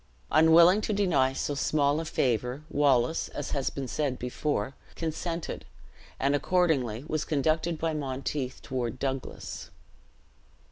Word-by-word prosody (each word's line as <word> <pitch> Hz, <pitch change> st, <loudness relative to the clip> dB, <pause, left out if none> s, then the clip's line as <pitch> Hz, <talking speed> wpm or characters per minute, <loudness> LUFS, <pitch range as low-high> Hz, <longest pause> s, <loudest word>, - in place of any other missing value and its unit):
Unwilling 170 Hz, +5 st, +6 dB
to 215 Hz, -, -1 dB
deny 175 Hz, -10 st, +2 dB
so 140 Hz, +2 st, -2 dB
small 145 Hz, +1 st, +1 dB
a 165 Hz, -, -3 dB
favor, 125 Hz, 0 st, 0 dB
Wallace, 140 Hz, 0 st, +2 dB
as 145 Hz, -, -5 dB
has 140 Hz, -3 st, 0 dB
been 135 Hz, -2 st, -5 dB
said 135 Hz, 0 st, -1 dB
before, 125 Hz, -1 st, -2 dB, 0.2 s
consented; 165 Hz, +1 st, -4 dB, 0.6 s
and 140 Hz, +1 st, +2 dB
accordingly 145 Hz, -8 st, +1 dB
was 155 Hz, -1 st, -1 dB
conducted 160 Hz, +2 st, 0 dB
by 160 Hz, 0 st, -1 dB
Monteith 135 Hz, -2 st, -3 dB
toward 130 Hz, -1 st, -3 dB
Douglas. 135 Hz, -1 st, -4 dB
145 Hz, 125 wpm, -28 LUFS, 130-160 Hz, 0.6 s, Unwilling